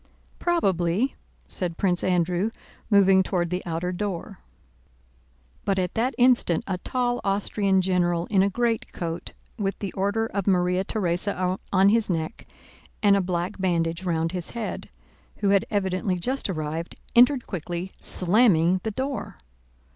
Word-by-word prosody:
"Probably," 195 Hz, -, +1 dB, 0.3 s
said 175 Hz, -3 st, -3 dB
Prince 180 Hz, -3 st, +1 dB
Andrew 180 Hz, +2 st, +1 dB, 0.4 s
moving 195 Hz, -2 st, +6 dB
toward 180 Hz, -2 st, -1 dB
the 180 Hz, +1 st, -1 dB
outer 170 Hz, +2 st, -2 dB
door. 195 Hz, 0 st, -4 dB, 1.2 s
But 195 Hz, -, 0 dB
at 180 Hz, -2 st, -1 dB
that 250 Hz, +4 st, 0 dB
instant 245 Hz, -9 st, +3 dB
a 185 Hz, -2 st, -3 dB
tall 245 Hz, +3 st, -1 dB
Austrian 195 Hz, -1 st, +1 dB
general 175 Hz, -2 st, +1 dB
in 195 Hz, -3 st, +4 dB
a 200 Hz, -, +3 dB
greatcoat, 200 Hz, -7 st, -2 dB, 0.3 s
with 195 Hz, -1 st, -1 dB
the 200 Hz, -3 st, -5 dB
order 200 Hz, +3 st, 0 dB
of 200 Hz, -3 st, -3 dB
Maria 180 Hz, -1 st, +2 dB
Theresa 185 Hz, -1 st, -1 dB
on 195 Hz, 0 st, +5 dB
his 225 Hz, 0 st, +2 dB
neck 160 Hz, -3 st, -3 dB, 0.6 s
and 200 Hz, -1 st, +6 dB
a 200 Hz, -, +2 dB
black 180 Hz, +2 st, -3 dB
bandage 170 Hz, -2 st, 0 dB
round 165 Hz, -2 st, 0 dB
his 180 Hz, -2 st, -3 dB
head, 225 Hz, -, -4 dB, 0.5 s
who 200 Hz, -, 0 dB
had 200 Hz, -1 st, +3 dB
evidently 190 Hz, -2 st, 0 dB
just 255 Hz, +7 st, -2 dB
arrived, 160 Hz, -1 st, -4 dB, 0.2 s
entered 250 Hz, +1 st, +5 dB
quickly, 175 Hz, 0 st, -5 dB
slamming 185 Hz, -2 st, +3 dB
the 220 Hz, -, -2 dB
door. 265 Hz, +5 st, -4 dB
190 Hz, 140 wpm, -25 LUFS, 175-205 Hz, 1.2 s, moving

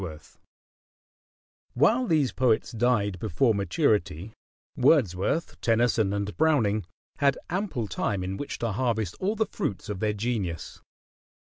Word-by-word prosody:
] -, -, -56 dB
While 235 Hz, -, +3 dB
these 150 Hz, -, +2 dB
poets 125 Hz, -3 st, +1 dB
died 110 Hz, -5 st, +1 dB
before 110 Hz, +5 st, +2 dB
maturity, 100 Hz, -, 0 dB, 0.4 s
Wordsworth, 125 Hz, -, +1 dB
Tennyson, 115 Hz, -3 st, +2 dB
and 100 Hz, 0 st, -3 dB
Browning 110 Hz, -, +2 dB, 0.3 s
had 140 Hz, -2 st, +2 dB
ample 180 Hz, -, -2 dB
time 95 Hz, +1 st, -2 dB
in 95 Hz, +1 st, -3 dB
which 145 Hz, -, -5 dB
to 115 Hz, -2 st, -2 dB
harvest 110 Hz, -4 st, -1 dB
all 200 Hz, +4 st, 0 dB
the 220 Hz, 0 st, +1 dB
fruits 100 Hz, -, -4 dB
of 100 Hz, -3 st, -4 dB
their 105 Hz, 0 st, 0 dB
genius. 105 Hz, -6 st, -3 dB
110 Hz, 125 wpm, -27 LUFS, 100-140 Hz, 0.4 s, While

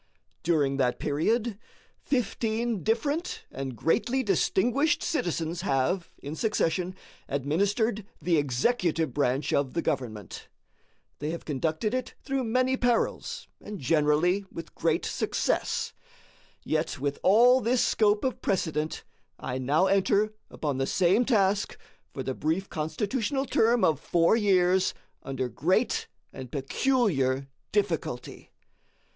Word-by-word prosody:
During 145 Hz, -5 st, +1 dB
that 125 Hz, -2 st, +1 dB
period 210 Hz, +9 st, 0 dB, 0.4 s
fifteen 230 Hz, -3 st, -1 dB
different 285 Hz, -, -1 dB
and 135 Hz, -1 st, -5 dB
greatly 240 Hz, -, +1 dB
distinguished 240 Hz, -, +2 dB
citizens 170 Hz, -, -1 dB
have, 170 Hz, +3 st, 0 dB
in 145 Hz, +2 st, -7 dB
succession, 185 Hz, -3 st, 0 dB, 0.3 s
administered 200 Hz, -, 0 dB, 0.2 s
the 170 Hz, -2 st, +2 dB
executive 160 Hz, -, +1 dB
branch 140 Hz, +1 st, 0 dB
of 140 Hz, 0 st, 0 dB
the 170 Hz, -, +1 dB
government. 110 Hz, -, -4 dB, 0.7 s
They 150 Hz, -, -3 dB
have 170 Hz, +1 st, -5 dB
conducted 160 Hz, -, -1 dB
it 255 Hz, -1 st, -3 dB
through 270 Hz, -2 st, -1 dB
many 255 Hz, +3 st, +2 dB
perils, 245 Hz, -, 0 dB, 0.2 s
and 210 Hz, 0 st, -6 dB
generally 155 Hz, +6 st, +2 dB
with 165 Hz, -, -8 dB
great -, -, 0 dB
success. -, -, -1 dB, 0.7 s
Yet, 155 Hz, -1 st, -1 dB
with 140 Hz, +1 st, -2 dB
all 245 Hz, +6 st, +6 dB
this 240 Hz, +2 st, +2 dB
scope 210 Hz, -1 st, +2 dB
of 260 Hz, -1 st, -2 dB
precedent, 160 Hz, -4 st, -1 dB, 0.3 s
I 130 Hz, +1 st, -4 dB
now 145 Hz, +8 st, +2 dB
enter 200 Hz, +2 st, +2 dB, 0.2 s
upon 145 Hz, -4 st, -3 dB
the 135 Hz, -, 0 dB
same 190 Hz, +6 st, +3 dB
task 205 Hz, -4 st, +1 dB, 0.3 s
for 135 Hz, -, -5 dB
the 130 Hz, -, -2 dB
brief 160 Hz, +8 st, -1 dB
Constitutional 220 Hz, -, -1 dB
term 235 Hz, -1 st, +3 dB
of 155 Hz, -3 st, +3 dB
four 170 Hz, +5 st, +3 dB
years 190 Hz, -3 st, +3 dB, 0.3 s
under 135 Hz, -1 st, -3 dB
great 180 Hz, -, 0 dB, 0.3 s
and 130 Hz, -2 st, -8 dB
peculiar 135 Hz, -, +1 dB, 0.2 s
difficulty. 170 Hz, -11 st, -2 dB
180 Hz, 120 wpm, -28 LUFS, 145-225 Hz, 0.7 s, all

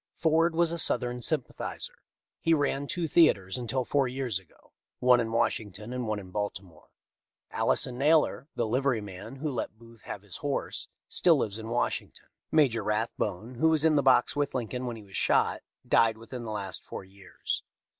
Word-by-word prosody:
Ford 165 Hz, +1 st, +2 dB
was 170 Hz, 0 st, +3 dB
a 170 Hz, -, -3 dB
Southern 125 Hz, -5 st, +1 dB
sympathizer. 150 Hz, -1 st, -1 dB, 0.5 s
He 165 Hz, 0 st, +3 dB
ran 145 Hz, -1 st, 0 dB
two 175 Hz, -1 st, -2 dB
theatres 100 Hz, -, +4 dB
until 125 Hz, +1 st, -2 dB
four 140 Hz, 0 st, +2 dB
years 125 Hz, -6 st, -2 dB
ago, 90 Hz, -4 st, -24 dB, 0.3 s
one 125 Hz, -1 st, +5 dB
in 115 Hz, -1 st, -1 dB
Washington 110 Hz, -1 st, -1 dB
and 125 Hz, -2 st, -3 dB
one 110 Hz, -1 st, -1 dB
in 95 Hz, -3 st, -9 dB
Baltimore. 95 Hz, -4 st, -5 dB, 0.6 s
Alison 125 Hz, 0 st, +2 dB
Naylor, 150 Hz, 0 st, +3 dB
'the 120 Hz, -, 0 dB
livery 130 Hz, +1 st, +1 dB
man 105 Hz, +4 st, -8 dB
who 150 Hz, +2 st, -3 dB
let 115 Hz, -3 st, -4 dB
Booth 115 Hz, 0 st, -16 dB
have -, -, -6 dB
his -, -, -8 dB
horse, -, -, -3 dB, 0.2 s
still 170 Hz, -2 st, +4 dB
lives 110 Hz, -4 st, -1 dB
in 110 Hz, 0 st, -7 dB
Washington. 120 Hz, +1 st, -2 dB, 0.2 s
Major 130 Hz, -9 st, +3 dB
Rathbone, 105 Hz, +1 st, -2 dB
who 160 Hz, -, +5 dB
was 160 Hz, -1 st, +3 dB
in 160 Hz, -1 st, +5 dB
the 145 Hz, -, +4 dB
box 130 Hz, -1 st, +4 dB
with 145 Hz, -2 st, -1 dB
Lincoln 125 Hz, +1 st, -3 dB
when 120 Hz, -, -3 dB
he 110 Hz, -, -10 dB
was 95 Hz, -1 st, -13 dB
shot, -, -, +2 dB, 0.3 s
died 115 Hz, -1 st, +4 dB
within 120 Hz, +2 st, -8 dB
the 110 Hz, -, -4 dB
last 100 Hz, -3 st, -3 dB
four -, -, -7 dB
years. 95 Hz, 0 st, -5 dB
120 Hz, 180 wpm, -29 LUFS, 105-140 Hz, 0.6 s, one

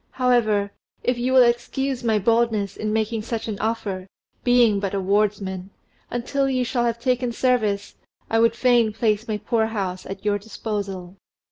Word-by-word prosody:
"However, 220 Hz, -6 st, +2 dB, 0.3 s
if 250 Hz, -1 st, 0 dB
you 250 Hz, +2 st, 0 dB
will 260 Hz, -1 st, +7 dB
excuse 245 Hz, +2 st, 0 dB
my 225 Hz, -2 st, +2 dB
boldness 220 Hz, -2 st, +1 dB
in 215 Hz, 0 st, -3 dB
making 220 Hz, +1 st, 0 dB
such 225 Hz, +1 st, -4 dB
an 210 Hz, -3 st, -4 dB
offer, 205 Hz, -4 st, -2 dB, 0.4 s
being 240 Hz, -4 st, +4 dB
but 195 Hz, 0 st, -2 dB
a -, -, 0 dB
wardsman, 195 Hz, -1 st, 0 dB, 0.4 s
until 270 Hz, +3 st, -1 dB
you 255 Hz, -1 st, 0 dB
shall 240 Hz, 0 st, 0 dB
have 235 Hz, 0 st, -1 dB
taken 250 Hz, 0 st, 0 dB
service 225 Hz, -5 st, 0 dB, 0.3 s
I 225 Hz, -, +1 dB
would 230 Hz, 0 st, +4 dB
fain 240 Hz, -3 st, +3 dB
place 215 Hz, 0 st, 0 dB
my 215 Hz, -1 st, -1 dB
poor 220 Hz, +1 st, 0 dB
house 190 Hz, -4 st, -4 dB
at 195 Hz, +1 st, -8 dB
your 205 Hz, -1 st, +1 dB
disposal." 200 Hz, -3 st, -5 dB
220 Hz, 165 wpm, -23 LUFS, 205-240 Hz, 0.4 s, will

